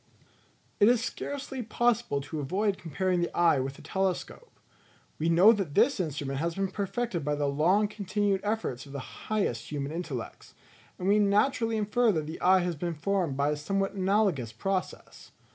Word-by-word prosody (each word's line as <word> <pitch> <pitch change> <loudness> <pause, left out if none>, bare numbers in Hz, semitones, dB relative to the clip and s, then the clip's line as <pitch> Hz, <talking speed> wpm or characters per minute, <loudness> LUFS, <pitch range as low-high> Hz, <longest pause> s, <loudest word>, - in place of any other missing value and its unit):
It 205 - +6
is 240 -2 +3
scarcely 270 -1 -5
possible 230 -10 0
to 155 +3 -6
avoid 190 +8 -1
comparing 180 +2 -1
the 175 - 0
eye 165 -5 +4
with 135 +1 -4
a - - -14
telescope. 190 - -3 0.6
We 160 +2 +1
know 180 +6 +7
that 190 -9 -3
this 230 +3 +4
instrument 145 -5 -3
has 165 +1 -1
been 195 -1 -1
perfected 200 -3 -2
by 150 +1 0
the 145 0 -1
long 170 +9 +2
continued 205 -1 -1
efforts 205 - -2
of 140 - -11
the 140 -2 -9
highest 125 - -1
human 145 -1 -3
intellects; 160 -8 -6 0.4
and 185 - -3
we 205 +2 +4
naturally 225 +3 +2
infer 220 +2 +2
that 155 -3 -1
the 160 +2 -7
eye 185 +1 +5
has 175 -1 -2
been 170 +2 -3
formed 170 -3 -1
by 140 +1 +2
a - - 0
somewhat 195 +6 -1
analogous 190 - +1
process. 185 - -4
185 Hz, 175 wpm, -28 LUFS, 150-205 Hz, 0.6 s, know